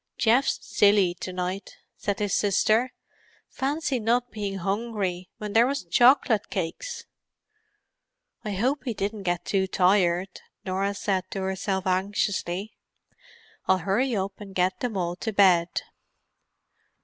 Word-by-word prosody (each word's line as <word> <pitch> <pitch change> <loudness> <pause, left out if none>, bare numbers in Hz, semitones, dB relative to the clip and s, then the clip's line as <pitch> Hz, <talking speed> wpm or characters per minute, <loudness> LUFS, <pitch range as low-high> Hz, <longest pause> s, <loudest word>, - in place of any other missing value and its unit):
"Geoff's 240 +4 +3
silly 200 -3 +3
to 185 - -5
night," 185 +2 -4 0.2
said 200 -1 -2
his 205 -2 -1
sister. 215 +5 +2 0.6
"Fancy 280 -1 -1
not 240 +2 +1
bein' 205 -2 -4
hungry 195 -2 -2
when 210 -1 -6
there 230 +2 +5
was 275 -3 -2
choc'lit 240 +3 +4
cakes!" 200 - -4 1.4
"I 210 -2 -3
hope 255 +7 0
he 240 -4 -2
didn't 205 +2 -3
get 175 -2 -2
too 190 -1 +1
tired," 185 -1 +2 0.2
Norah 195 +2 -1
said 190 -2 -1
to 195 - -4
herself 190 0 -2
anxiously. 190 +1 -1 0.9
"I'll 190 - +4
hurry 205 +8 0
up 195 +1 -3
and 195 -2 -10
get 185 0 +1
them 235 -5 -2
all 175 -1 -1
to 220 - -3
bed." 185 -4 +4
200 Hz, 130 wpm, -26 LUFS, 185-225 Hz, 1.4 s, there